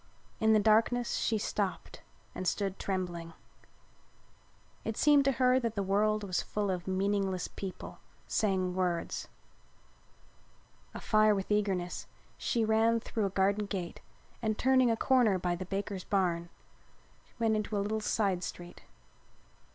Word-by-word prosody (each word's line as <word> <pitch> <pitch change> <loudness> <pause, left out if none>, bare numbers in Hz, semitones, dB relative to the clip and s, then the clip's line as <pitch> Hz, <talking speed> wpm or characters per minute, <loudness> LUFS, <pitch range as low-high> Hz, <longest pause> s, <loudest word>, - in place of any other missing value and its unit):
In 220 0 +4
the 215 - +5
darkness 225 +3 +2
she 220 - +1
stopped 205 -2 -3 0.3
and 185 - -4
stood 195 -1 -1
trembling. 175 -3 -3 1.5
It 225 - -4
seemed 290 -2 +5
to 275 - +3
her 255 +1 +3
that 230 -3 -2
the 200 - 0
world 210 +2 +1
was 185 -3 -1
full 205 -2 -2
of 180 -1 -4
meaningless 190 -1 0
people 190 -2 -8 0.3
saying 190 -4 0
words. 180 -2 -2 1.7
Afire 215 -1 +3
with 195 +1 -4
eagerness 195 -4 -1 0.3
she 230 -2 0
ran 225 +1 +3
through 220 -2 -2
a - - -3
garden 200 +2 +1
gate 185 -4 -5 0.4
and, 220 -2 -1
turning 260 -1 +4
a 225 - +1
corner 245 -7 +3
by 180 -1 -1
the 185 +2 -6
banker's 195 0 -4
barn, 175 -4 0 0.9
went 225 -2 +2
into 215 0 -2
a 200 - +1
little 215 +1 -1
side 195 -4 0
street. 175 0 -8
205 Hz, 135 wpm, -31 LUFS, 185-220 Hz, 1.7 s, the